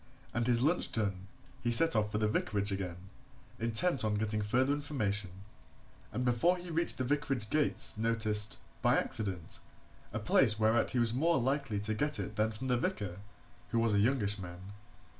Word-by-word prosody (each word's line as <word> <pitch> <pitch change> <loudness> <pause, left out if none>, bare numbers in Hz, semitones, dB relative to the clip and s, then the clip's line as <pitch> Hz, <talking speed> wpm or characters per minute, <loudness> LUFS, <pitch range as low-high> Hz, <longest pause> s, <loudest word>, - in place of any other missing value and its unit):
And 120 0 -1
his 120 0 +3
lunch 165 +5 +2
done, 100 -4 -2 0.3
he 120 - -1
set 165 +8 +4
off 105 -1 +1
for 105 - -1
the 105 0 +1
vicarage 105 -1 -1
again, 95 -3 -3 0.6
intent 115 +5 +1
on 105 -1 0
getting 105 0 -1
further 130 +7 +1
information, 110 -10 -2 0.8
and 125 +4 -2
before 125 +9 +2
he 175 -1 -8
reached 160 -7 +1
the 130 - -1
vicarage 135 -5 -1
gates 150 -7 +2
noticed, 110 +1 +1 0.2
by - - +3
accident, 95 -7 -1 0.5
a 110 - -3
place 110 +1 +4
whereat 110 +1 +2
he - - -2
was 115 -1 +3
more 165 +6 +2
likely 135 -4 -1
to 110 +1 -2
get 145 +7 -1
it 105 - -5
than 110 +1 +1
from 110 +4 -7
the 125 -1 +1
vicar 100 -6 -3 0.5
who 115 - -1
was 115 -2 +2
a 100 - +3
youngish 105 -3 +1
man. 90 +2 -9
115 Hz, 180 wpm, -32 LUFS, 105-130 Hz, 0.8 s, set